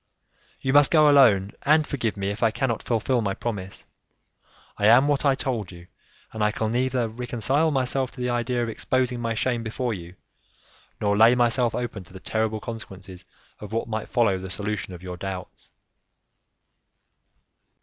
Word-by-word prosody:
"You 130 - 0
must 145 -1 +6
go 155 -2 +5
alone, 115 -9 +5
and 155 +2 +3
forgive 115 -8 -2
me 100 0 -2
if 105 - -7
I 115 - +4
cannot 120 0 -2
fulfil 120 +1 0
my 100 -3 -2
promise. 100 -5 -5 1.0
I 105 - +3
am 125 +5 +6
what 145 0 +1
I 135 -1 +4
told 120 -8 -3
you, 85 -1 -12 0.5
and 110 -1 -2
I 105 - +3
can 110 +1 -2
neither 125 0 0
reconcile 125 +6 0
myself 130 -2 0
to - - -12
the 125 0 -1
idea 120 0 -1
of - - -2
exposing 125 +2 -1
my 115 -1 -2
shame 120 +1 0
before 115 +1 -3
you, 85 -2 -9 0.8
nor 100 -1 +1
lay 115 +3 +6
myself 120 -1 +2
open 120 -6 -4
to 90 - -18
the 95 - -9
terrible 110 +2 -1
consequences 95 -5 -9 0.3
that 110 +2 -4
might 110 -1 -4
follow 110 -6 +2
the 95 0 -7
solution 100 -1 -4
of 90 - -13
your 90 -1 -6
doubts." 95 -1 -7
115 Hz, 170 wpm, -24 LUFS, 100-125 Hz, 1.0 s, must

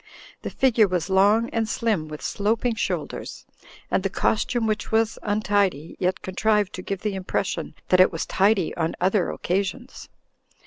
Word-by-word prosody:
The - - -4
figure 235 -5 +3
was 185 0 -2
long 205 +4 +4
and 225 -1 -1
slim, 215 -10 0
with 155 -1 -8
sloping 225 +4 0
shoulders, 225 - -4 0.5
and - - +2
the - - -1
costume, 230 +2 0
which 215 -1 -2
was 225 0 +1
untidy, 205 -7 0
yet 185 0 -1
contrived 205 +1 +1
to 185 - -6
give 195 +1 -4
the 210 -2 -1
impression 185 -4 -3
that 185 - +4
it 185 - +6
was 165 - -3
tidy 195 -2 +2
on 165 -1 -1
other 190 +1 +2
occa 190 +3 -1
sions. 250 +6 -8
200 Hz, 165 wpm, -24 LUFS, 185-220 Hz, 0.5 s, it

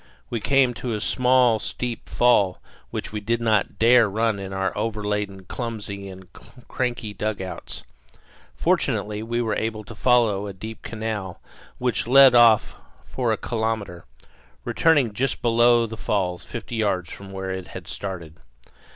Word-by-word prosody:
We 120 - -1
came 135 +2 +3
to 120 -1 -4
a - - -3
small 125 -1 +3
steep 120 +2 -5
fall 105 -7 +3 0.3
which - - -5
we 105 - -3
did 115 +3 0
not 110 -3 +1
dare 115 -1 +5
run 110 0 0
in 95 0 -6
our 95 0 -2
over 105 0 -2
laden, 105 -2 -2
clumsy, 105 -4 -5
and 95 0 -11 0.4
cranky 120 -4 -3
dugouts. 100 -2 -5 0.7
Fortunately, 105 0 0
we 120 +2 -1
were 110 -2 -1
able 110 -1 -3
to 105 - -10
follow 110 -3 +2
a 100 - -6
deep 110 +4 -8
canal 110 -5 -5 0.4
which 125 -3 -1
led 135 0 +8
off 115 -3 +5 0.3
for 125 -3 -1
a 110 - +1
kilometre, 110 -7 -3 0.6
returning 145 -9 +3
just 130 +4 -2
below 120 0 +4
the 110 0 -7
falls, 90 -5 -1
fifty 115 0 -6
yards 95 -6 0
from 100 -1 -9
where 95 0 -4
it 95 -1 -5
had - - -9
started. 85 -5 -7
110 Hz, 150 wpm, -23 LUFS, 100-120 Hz, 0.7 s, led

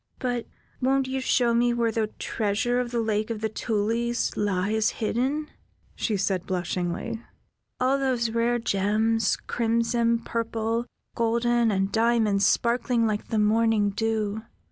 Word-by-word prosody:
"But 245 -2 -2 0.3
won't 265 +1 +2
you 265 0 -2
show 245 -2 +2
me 240 +1 +2
where 230 -1 +1
the 220 -1 0
treasure 225 +4 0
of 250 -1 -2
the 235 0 -1
Lake 215 0 -1
of 225 -2 -3
the 220 - 0
Tulies 230 +2 -1
lies 205 +2 +1
hidden?" 265 +7 -1 0.4
she 215 -3 -1
said, 190 -2 -1
blushingly. 180 +5 -2 0.6
"All 260 +2 +2
those 250 -4 0
rare 235 +1 +1
gems, 220 +1 +1
crimson, 230 0 +1
purple, 230 0 -2 0.3
golden, 235 0 +2
and 195 -1 0
diamonds 220 -3 +3
sparkling 235 0 +2
like 215 -1 -1
the 225 - -1
morning 215 -1 +3
dew. 220 0 -1
230 Hz, 135 wpm, -26 LUFS, 215-240 Hz, 0.6 s, diamonds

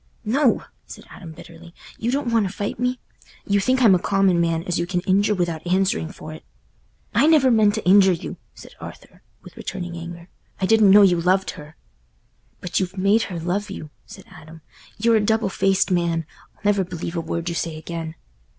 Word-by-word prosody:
"No," 255 +3 +2 0.2
said - - -11
Adam, 170 -4 -10
bitterly; 170 +2 -14 0.2
"you 235 - -1
don't 260 -2 -1
want 220 -4 +2
to - - -6
fight 205 +2 -5
me—you 250 -4 -3
think 255 +6 +1
I'm 215 -5 +7
a 180 - +3
common 195 -2 +2
man, 165 -1 0
as 175 -2 -2
you 170 - -2
can 180 -1 -1
injure 200 +3 +2
without 170 -4 -2
answering 185 -2 0
for 155 -5 -10
it." 155 - -12 0.7
"I 295 - +4
never 295 -5 +5
meant 215 -2 +3
to 220 - -5
injure 190 0 +6
you," 170 - -6 0.2
said - - -13
Arthur, - - -12 0.2
with - - -14
returning 175 -1 -6
anger. 170 0 -9 0.3
"I 190 - 0
didn't 220 0 +5
know 205 +1 +8
you 175 -3 +3
loved 190 +2 +1
her." 150 +1 -13 0.9
"But 180 - -1
you've 190 0 -4
made 200 +4 +3
her 175 -3 -5
love 190 +5 -2
you," 155 -6 -8 0.2
said - - -12
Adam. 160 +1 -14 0.4
"You're 230 +1 +3
a - - +1
double 220 0 +1
faced 195 0 +1
man—I'll 170 -3 -3
never 205 -1 +2
believe 175 -1 -6
a 170 - -1
word 165 +1 -4
you 170 - -1
say 165 -1 -3
again." 160 0 -6
185 Hz, 195 wpm, -22 LUFS, 170-205 Hz, 0.9 s, know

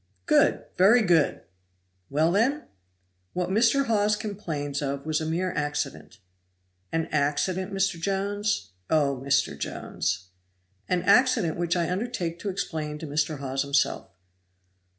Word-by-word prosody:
"Good! - - +3
very 220 +6 +6
good! 170 -6 +3 0.7
Well, 155 +4 +2
then?" 255 - +2 0.7
"What 180 0 -1
Mr. 235 +7 +3
Hawes 210 -2 +2
complains 160 -10 -4
of 140 0 -3
was 155 0 0
a 155 - -2
mere 180 +3 -1
accident." 145 -1 -3 0.7
"An 165 0 0
accident, 175 +6 0
Mr. 195 -3 0
Jones? 200 - -1 0.2
Oh, 140 -4 +2
Mr. 140 0 +1
Jones!" 90 0 -3 0.6
"An 180 -1 +1
accident 225 -4 +4
which 175 +1 0
I 175 0 0
undertake 180 -5 -3
to 205 - -3
explain 155 -5 -3
to 160 - -7
Mr. 150 +1 -1
Hawes 135 -1 -2
himself." 140 0 0
170 Hz, 130 wpm, -26 LUFS, 145-200 Hz, 0.7 s, very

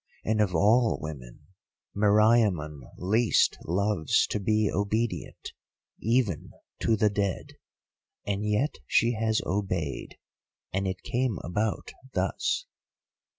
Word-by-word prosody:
And 110 0 +2
of 95 -4 +1
all 110 +7 +4
women, 70 -7 -9 0.5
Meriamun 105 -7 +3 0.2
least 110 +5 +2
loves 95 -2 +2
to 105 - 0
be 105 +1 +2
obedient, 105 +4 -2 0.5
even 115 - 0 0.3
to 115 - +3
the 105 -1 +2
dead. 100 -3 -2 0.7
And 100 0 -2
yet 105 +8 0
she 115 +1 +3
has 110 -1 0
obeyed, 90 -7 -3 0.6
and 95 +1 0
it 95 -1 -4
came 125 -4 -1
about 105 +4 -2 0.2
thus. - - 0
105 Hz, 110 wpm, -27 LUFS, 95-110 Hz, 0.7 s, all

